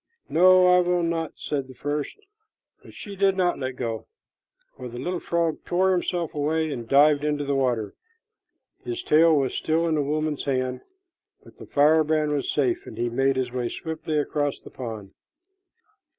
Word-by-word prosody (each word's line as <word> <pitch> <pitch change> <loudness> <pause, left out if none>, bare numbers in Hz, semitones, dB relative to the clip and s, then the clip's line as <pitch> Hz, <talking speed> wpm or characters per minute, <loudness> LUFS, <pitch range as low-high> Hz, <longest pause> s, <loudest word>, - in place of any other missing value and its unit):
"No, 185 +2 +6
I 180 0 +6
will 180 -1 +1
not," 165 -2 -2
said 140 -3 -3
the 130 - -13
first; 145 +3 -3 0.7
but - - -15
she 200 -1 -8
did 195 0 +2
let 180 -2 +1
him 130 -1 -4
go, 115 -3 -4 0.7
for 125 - -8
the 120 - -9
little 180 +7 -3
frog 170 -2 -1
tore 190 +2 +1
himself 175 -2 -1
away 155 +2 -1
and 120 -4 -6
dived 145 +1 +5
into 150 -1 -1
the 140 - -1
water. 125 -6 0 0.9
His 360 0 -5
tail 160 - +5
was 135 -2 0
still 160 +1 0
in 165 - 0
the 150 - +1
woman's 150 +1 -2
hand, 130 -2 -1 0.6
but - - -18
the - - -11
firebrand 155 +1 +3
was 145 -2 -1
safe, 355 -1 0
and - - -10
he 120 0 -1
made 135 +3 +1
his 130 -2 -2
way 125 -1 -2
swiftly 160 +1 -4
across 145 -1 -1
the - - -14
pond. 110 -6 -7
150 Hz, 175 wpm, -25 LUFS, 130-170 Hz, 0.9 s, No